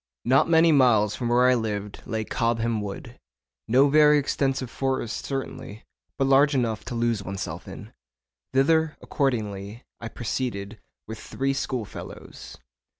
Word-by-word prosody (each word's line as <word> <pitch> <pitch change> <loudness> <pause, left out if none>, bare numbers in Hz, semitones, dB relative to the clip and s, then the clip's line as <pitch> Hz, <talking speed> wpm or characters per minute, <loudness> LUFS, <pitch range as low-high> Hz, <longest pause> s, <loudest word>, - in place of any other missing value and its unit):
Not 135 +6 +3
many 165 0 +5
miles 115 -7 +4
from 120 -2 -3
where 125 +1 +4
I 130 - +5
lived 105 -4 -3
lay 110 0 -2
Cobham 115 -1 -1
Wood, 100 -1 -8 0.5
no 130 +5 +5
very 150 +1 +5
extensive 135 -3 -1
forest 130 -4 -2
certainly, 130 -5 -6 0.3
but 135 - +1
large 140 +2 +4
enough 115 -4 -1
to 125 - -5
lose 115 -2 0
oneself 95 0 -6
in. - - -10 0.6
Thither, 160 +4 +2
accordingly, 110 -5 -2 0.2
I 115 - -6
proceeded 110 -3 -4 0.3
with 110 0 -8
three 135 0 -2
schoolfellows. 130 -5 -6
120 Hz, 135 wpm, -25 LUFS, 110-135 Hz, 0.6 s, many